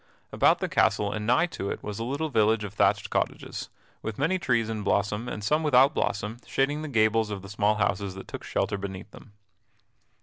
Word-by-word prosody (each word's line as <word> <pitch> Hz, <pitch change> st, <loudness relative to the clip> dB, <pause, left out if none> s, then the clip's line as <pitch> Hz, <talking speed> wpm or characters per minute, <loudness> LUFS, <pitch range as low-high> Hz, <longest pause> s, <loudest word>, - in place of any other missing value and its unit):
About -, -, +4 dB
the -, -, -2 dB
castle 105 Hz, -1 st, +2 dB
and 105 Hz, 0 st, -4 dB
nigh 125 Hz, +8 st, +4 dB
to 100 Hz, -, -5 dB
it -, -, -5 dB
was 105 Hz, +1 st, -5 dB
a -, -, -2 dB
little 140 Hz, +6 st, -2 dB
village 110 Hz, -3 st, +2 dB
of 100 Hz, -2 st, -6 dB
thatched -, -, +2 dB
cottages, -, -, -2 dB, 0.3 s
with 110 Hz, -1 st, -5 dB
many 180 Hz, +7 st, +1 dB
trees 120 Hz, -8 st, +1 dB
in 110 Hz, -1 st, -3 dB
blossom 105 Hz, +3 st, 0 dB
and 105 Hz, -, -5 dB
some 150 Hz, +9 st, +2 dB
without 140 Hz, -1 st, +5 dB
blossom 105 Hz, 0 st, -2 dB
shading 145 Hz, +3 st, 0 dB
the 155 Hz, -, -4 dB
gables 110 Hz, -3 st, +2 dB
of 100 Hz, -2 st, -5 dB
the 95 Hz, -, -10 dB
small 105 Hz, +1 st, +1 dB
houses 100 Hz, -2 st, -1 dB
that 95 Hz, -, -9 dB
took -, -, -7 dB
shelter 100 Hz, -, -1 dB
beneath 95 Hz, +1 st, -7 dB
them. 105 Hz, -, -15 dB
110 Hz, 205 wpm, -27 LUFS, 100-130 Hz, 0.3 s, without